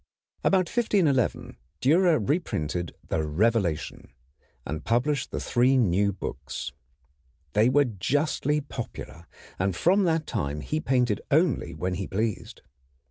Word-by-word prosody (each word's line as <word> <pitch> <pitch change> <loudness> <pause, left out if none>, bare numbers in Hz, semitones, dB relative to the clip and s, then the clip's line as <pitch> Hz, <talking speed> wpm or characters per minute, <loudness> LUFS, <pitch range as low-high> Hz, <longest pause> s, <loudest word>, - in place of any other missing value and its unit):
About 185 -2 +3
1511 170 - +1 0.2
Dürer 160 - +3
reprinted 85 - -1
the 80 - 0
Revelation, 90 +1 0 0.5
and 75 +2 -4
published 125 +4 0
the - - -4
three 130 +2 +3
new 100 -3 +2
books. 70 -7 -6 0.8
They 110 +4 +4
were 145 +2 +4
justly 145 - 0
popular, 110 - -8 0.3
and 95 0 0
from 190 - +3
that 160 -2 +1
time 75 - -3
he 155 - -2
painted 125 -6 +1
only 155 -1 +2
when 90 0 -2
he 95 +1 -3
pleased. 110 +1 -3
120 Hz, 120 wpm, -26 LUFS, 95-150 Hz, 0.8 s, They